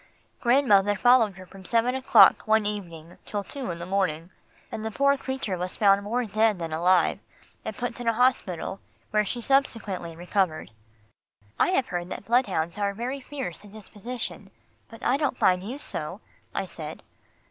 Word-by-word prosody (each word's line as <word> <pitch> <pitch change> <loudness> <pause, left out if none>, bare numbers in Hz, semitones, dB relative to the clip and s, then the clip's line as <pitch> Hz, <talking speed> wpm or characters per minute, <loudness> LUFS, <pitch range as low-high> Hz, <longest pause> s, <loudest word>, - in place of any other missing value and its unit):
Grandmother 210 -6 +4
followed 230 -1 +4
her 185 0 -11
from 190 +1 -14
seven 230 +5 +1
o'clock 265 -3 +5
one 220 -1 +3
evening 175 -5 -6
till 205 -1 -4
two 270 +4 -6
the 170 - -3
next 170 +1 -7
morning, 180 -3 -1 0.4
and 215 - -5
the 220 - -2
poor 280 +5 +3
creature 265 -7 -3
was 180 +1 -3
found 200 -1 +5
more 235 +4 -1
dead 215 0 +2
than 165 -2 -5
alive, 175 +2 +3 0.4
and - - -6
put 245 -1 -4
in 240 - -5
a 230 - +4
hospital 220 -6 0 0.3
where 210 0 +3
she 240 +4 -4
subsequently 220 -10 0
recovered." 175 - -1 0.9
"I - - +4
have 315 -9 +1
heard 175 0 -3
that 195 - -7
bloodhounds 195 -7 +1
are 200 -1 0
very 250 +5 -3
fierce 265 - -6
in 205 - -13
disposition, 215 +3 -6 0.4
but 225 +1 -13
I 260 - +2
don't 285 -4 -1
find 180 -1 +3
you 230 +8 -6
so," - - -5 0.3
I - - -2
said. - - -8
210 Hz, 170 wpm, -26 LUFS, 185-245 Hz, 0.9 s, o'clock